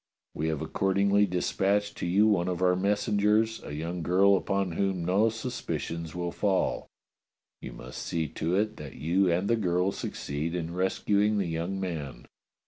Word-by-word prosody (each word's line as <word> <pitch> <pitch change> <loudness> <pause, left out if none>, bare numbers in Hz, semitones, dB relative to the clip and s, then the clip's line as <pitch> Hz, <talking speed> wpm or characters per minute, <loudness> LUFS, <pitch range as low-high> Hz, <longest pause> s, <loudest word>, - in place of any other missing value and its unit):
We 80 - -2
have 80 -3 -2
accordingly 100 +1 +2
dispatched 100 +3 0
to - - -3
you 100 +5 +4
one 95 -5 +2
of 90 0 -1
our 90 0 +4
messengers, 105 +3 +1
a 75 - -6
young 85 +3 -4
girl 95 +4 +4
upon 100 -1 0
whom 95 0 -1
no 100 +5 +3
suspicions 85 -8 -4
will 85 -1 -2
fall. 95 -1 0 0.7
You - - -7
must 60 +1 -8
see 80 -2 -2
to 85 +3 -1
it 105 +2 0
that 75 -2 -9
you 85 +6 +2
and 90 +4 +1
the 115 - +3
girl 90 -3 +1
succeed 75 +1 -4
in 85 -1 -3
rescuing 100 +3 +1
the 100 - +1
young 85 +3 -3
man. 80 -8 -5
95 Hz, 165 wpm, -28 LUFS, 85-100 Hz, 0.7 s, you